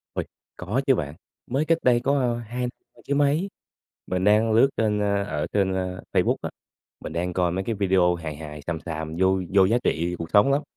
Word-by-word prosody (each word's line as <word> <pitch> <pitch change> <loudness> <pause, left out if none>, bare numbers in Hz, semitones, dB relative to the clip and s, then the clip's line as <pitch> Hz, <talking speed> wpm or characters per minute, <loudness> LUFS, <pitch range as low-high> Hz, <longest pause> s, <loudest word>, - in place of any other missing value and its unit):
Ôi! - - -2 0.3
Có 105 +10 -1
chứ 135 - +5
bạn, 75 -4 -4 0.4
mới 140 +5 +1
cách 165 0 +3
đây 120 -1 +4
có, 140 +3 +1
ơ, 120 -2 +1
2 120 +2 -6
năm 125 0 -7
chứ 140 - +1
mấy, 145 +6 +2 0.6
mình 90 0 -1
đang 105 +3 +4
lướt 120 +5 +5
trên, 105 -2 +1
ơ, 100 -1 +1
ở 75 -7 -3
trên, 95 -2 +2
ơ, 90 0 -3
Facebook - - +3
á, - - -3 0.5
mình 80 - -7
đang 90 +2 -2
coi 90 -1 +1
mấy 95 +2 -2
cái 115 +1 -2
video 95 -3 +3
hài 80 -3 -6
hài, 75 -1 -8
xàm 85 -2 -2
xàm, 80 -1 -5
vô 95 0 +3
vô 95 -1 +6
giá 115 +5 +3
trị 85 +2 0
cuộc 85 -1 -5
sống 105 +7 +5
lắm. 140 +2 +2
100 Hz, 225 wpm, -24 LUFS, 90-120 Hz, 0.6 s, vô